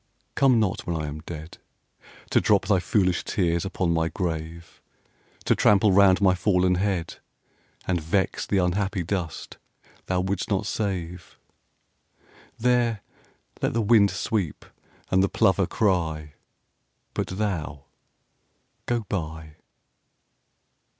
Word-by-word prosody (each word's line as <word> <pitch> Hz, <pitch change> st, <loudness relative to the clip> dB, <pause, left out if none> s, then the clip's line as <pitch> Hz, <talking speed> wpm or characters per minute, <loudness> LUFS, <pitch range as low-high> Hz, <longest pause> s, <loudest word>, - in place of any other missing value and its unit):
Come 130 Hz, -4 st, +4 dB
not, 100 Hz, -4 st, -1 dB
when 85 Hz, -, -1 dB
I 75 Hz, -, -3 dB
am 75 Hz, +1 st, -6 dB
dead, 80 Hz, 0 st, -8 dB, 0.7 s
To -, -, +4 dB
drop 100 Hz, -2 st, +3 dB
thy 100 Hz, -2 st, +3 dB
foolish 90 Hz, -1 st, +1 dB
tears 85 Hz, -2 st, 0 dB
upon 90 Hz, -3 st, -1 dB
my 80 Hz, 0 st, +1 dB
grave, 80 Hz, -1 st, -5 dB, 0.6 s
To -, -, +4 dB
trample 105 Hz, 0 st, +4 dB
round 95 Hz, -1 st, +5 dB
my 95 Hz, -2 st, +5 dB
fallen 90 Hz, 0 st, +2 dB
head, 90 Hz, -3 st, -2 dB, 0.7 s
And 90 Hz, -3 st, 0 dB
vex 95 Hz, +5 st, -1 dB
the 100 Hz, -, +1 dB
unhappy 95 Hz, +1 st, 0 dB
dust 85 Hz, -2 st, -4 dB, 0.5 s
thou 90 Hz, -1 st, +1 dB
wouldst 95 Hz, 0 st, -2 dB
not 100 Hz, 0 st, 0 dB
save. 90 Hz, -5 st, -4 dB, 1.2 s
There 120 Hz, -3 st, +1 dB, 0.6 s
let -, -, 0 dB
the 115 Hz, -, +1 dB
wind 105 Hz, -2 st, +5 dB
sweep 95 Hz, -3 st, -3 dB, 0.5 s
and 95 Hz, -, +4 dB
the 95 Hz, -, +2 dB
plover 95 Hz, -1 st, +2 dB
cry; 80 Hz, -7 st, -1 dB, 0.8 s
But -, -, -2 dB
thou, 90 Hz, -8 st, -3 dB, 1.0 s
go 120 Hz, -1 st, 0 dB
by. 80 Hz, -6 st, -6 dB
95 Hz, 120 wpm, -25 LUFS, 85-100 Hz, 1.2 s, round